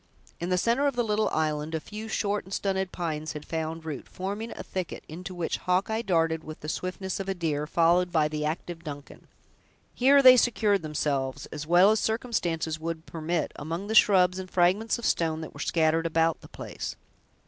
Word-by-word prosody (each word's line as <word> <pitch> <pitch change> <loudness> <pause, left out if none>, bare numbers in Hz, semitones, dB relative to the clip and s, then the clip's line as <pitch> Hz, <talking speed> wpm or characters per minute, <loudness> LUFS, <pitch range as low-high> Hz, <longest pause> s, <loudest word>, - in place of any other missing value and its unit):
In 175 - -3
the 180 - +2
center 235 +9 +2
of 280 - -1
the 240 - +1
little 215 -1 +1
island, 155 0 -1
a - - 0
few 215 +7 -8
short 205 -1 -1
and 190 - -15
stunted 190 -2 -1
pines 155 -3 -3
had 150 - -7
found 160 0 -4
root, 155 -3 -6
forming 200 +5 -4
a - - -5
thicket, 185 -2 -5
into 180 +4 -7
which 175 -2 -2
Hawkeye 195 +5 0
darted 165 -6 +1
with 155 0 -9
the 150 - -5
swiftness 185 +3 -3
of 195 0 -4
a 195 - -1
deer, 150 -4 -1
followed 175 +2 +3
by 155 -3 +3
the 150 0 -3
active 165 +2 -4
Duncan. 145 -3 -9 0.7
Here 275 +2 +5
they 255 -1 +10
secured 215 -5 +2
themselves, 145 -3 -2
as 150 0 -6
well 180 +4 +6
as 220 - +2
circumstances 175 -9 -1
would 165 0 -4
permit, 165 +1 -2
among 165 +5 -4
the 215 - -3
shrubs 185 -4 +5
and 185 -1 -7
fragments 190 +7 +2
of 235 - -6
stone 160 -1 +1
that 160 - -8
were - - -12
scattered 165 0 +2
about 165 0 +1
the - - -12
place. - - -6
175 Hz, 195 wpm, -27 LUFS, 160-200 Hz, 0.7 s, they